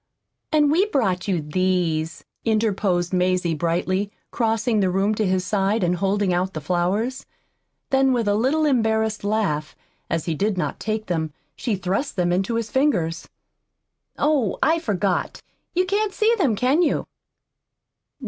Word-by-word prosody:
"And 300 -2 +4
we 370 +7 +3
brought 205 - 0
you 180 -5 0
these," 170 0 -1 0.2
interposed 200 -5 +1
Mazie 180 -2 +1
brightly, 180 +5 -1 0.2
crossing 225 0 +1
the 190 -2 +2
room 195 +3 +1
to 215 -1 0
his 185 0 0
side 205 +1 +1
and 175 0 +1
holding 195 0 +1
out 185 +1 -1
the - - -2
flowers. 185 - -1 0.6
Then, 270 0 +4
with 235 -4 0
a 205 - +3
little 265 +9 +2
embarrassed 220 -5 +1
laugh, 200 -8 -1 0.3
as 165 -2 -1
he 165 - -1
did 200 +5 -1
not 180 - -2
take 215 0 -2
them, 160 -3 -2 0.2
she 230 -5 -1
thrust 190 +9 -2
them 175 -2 +1
into 195 +6 0
his 230 -1 -2
fingers. 180 - 0 0.9
"Oh, 285 -9 +1
I 320 +4 +3
forgot. 200 - -1 0.3
You 365 +1 +3
can't 405 +2 0
see 440 +2 +3
them, 290 - +1
can 260 - +2
you?" 345 - +1
205 Hz, 150 wpm, -23 LUFS, 180-245 Hz, 0.9 s, And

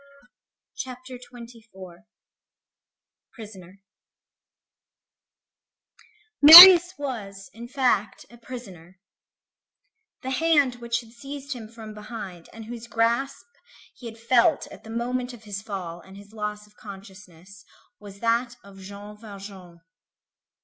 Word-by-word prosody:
CHAPTER 255 0 -9
XXIV—PRISONER 215 -3 -17 2.6
Marius 350 +4 +11
was, 205 -9 -8
in 235 +2 -11
fact, 245 -6 -2
a 240 - -16
prisoner. 190 -8 -12 1.2
The 260 - -5
hand 285 -3 +1
which 235 0 -4
had 225 -1 -19
seized 280 +3 -9
him 230 -4 -11
from 220 -1 -12
behind 210 -5 -10
and 225 -1 -12
whose 235 0 -10
grasp 235 +4 -2 0.5
he 245 - -12
had 225 0 -11
felt 250 +6 +1
at - - -14
the 220 - -14
moment 245 +2 -4
of 230 -2 -15
his 200 -2 -7
fall 185 -5 -8
and 190 +2 -16
his 200 +1 -16
loss 210 -1 -6
of 210 0 -27
consciousness 195 -2 -15 0.4
was 200 -1 -14
that 235 +1 -1
of 195 -1 -16
Jean 200 +2 -12
Valjean. 195 -5 -13
225 Hz, 110 wpm, -23 LUFS, 200-245 Hz, 2.6 s, Marius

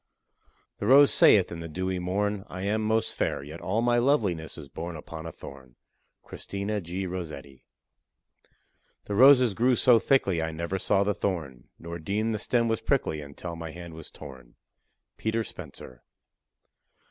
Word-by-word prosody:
The - - -2
rose 140 +2 +7
saith 100 -4 +5
in 85 - -6
the 85 0 -7
dewy 95 +3 -2
morn, 100 +3 -1
I 95 +1 -6
am 105 +2 0
most 110 +1 0
fair; - - -2
Yet 75 +4 -9
all 105 +6 -1
my 120 0 +3
loveliness 105 - 0
is 75 -3 -9
born 85 +5 -6
Upon 80 +1 -8
a - - -6
thorn. 65 -5 -12 0.5
CHRISTINA 100 +1 -4
G. 90 +3 -4
ROSSETTI. 75 -7 -7 1.4
The 105 - -4
roses 125 0 +6
grew 125 +5 +2
so 120 -1 +5
thickly, 100 -10 +2
I 80 0 -2
never 85 +4 -3
saw 100 +1 +2
the 105 +1 0
thorn, 80 -12 -4
Nor 85 0 -7
deemed 105 +7 -1
the 105 - -2
stem 115 +2 +1
was 115 -1 -1
prickly 75 - 0
until 75 +4 -8
my 80 -1 -7
hand 85 0 -9
was 80 -1 -10
torn. 65 -4 -12 0.6
PETER 110 +1 -1
SPENCER. 65 - -11
95 Hz, 160 wpm, -27 LUFS, 80-110 Hz, 1.4 s, rose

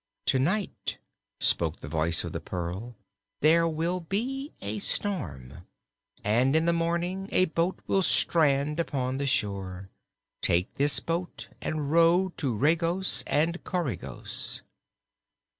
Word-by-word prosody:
"To 130 - +3
night," 185 +9 -1 0.4
spoke 80 -1 +2
the - - -7
voice 80 +2 +1
of - - -5
the - - -4
pearl, 95 +7 -5 0.5
"there 165 +2 +5
will 165 +3 -1
be 250 - -3
a 105 +2 -3
storm, 85 - -1 0.6
and 125 +7 +3
in 160 +1 +3
the 170 - +3
morning 170 +3 -1
a 185 - +4
boat 170 +2 -1
will 195 - +2
strand 150 -4 +3
upon 130 -5 -1
the 140 - -1
shore. 95 -6 -2 0.5
Take 90 +2 +2
this 145 +1 +3
boat 170 +2 -4
and 150 -2 -2
row 170 +3 +4
to 140 -5 -1
Regos 165 - +1
and 165 +4 +1
Coregos." 175 -9 -4
155 Hz, 125 wpm, -28 LUFS, 105-170 Hz, 0.6 s, there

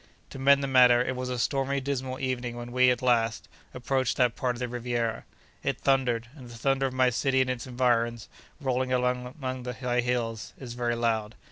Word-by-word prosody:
To 135 - -8
mend 140 +1 +5
the - - 0
matter, 125 -2 +6
it 130 +1 -3
was 125 0 -4
a 125 - -2
stormy 135 +2 0
dismal 130 -1 -3
evening 125 -2 -2
when 120 0 -7
we, 125 0 +4
at 125 +1 0
last, 115 -3 +1 0.2
approached 130 0 -1
that 125 -2 +2
part 125 -1 -1
of - - -9
the 125 - -2
Riviera. 120 -1 -2 0.4
It - - -2
thundered; 125 -4 +1
and 130 -5 -11
the 120 - -10
thunder 135 +2 +1
of 130 - -6
my 130 -1 +3
city 130 +2 +1
and 130 -1 +2
its 125 0 -5
environs, 120 -2 0 0.3
rolling 130 -2 -1
among 125 +1 -1
the 125 0 -5
high 125 0 0
hills, 115 -3 -2
is 125 -3 -8
very 120 -1 -1
loud. 110 -2 -1
125 Hz, 205 wpm, -27 LUFS, 120-130 Hz, 0.4 s, matter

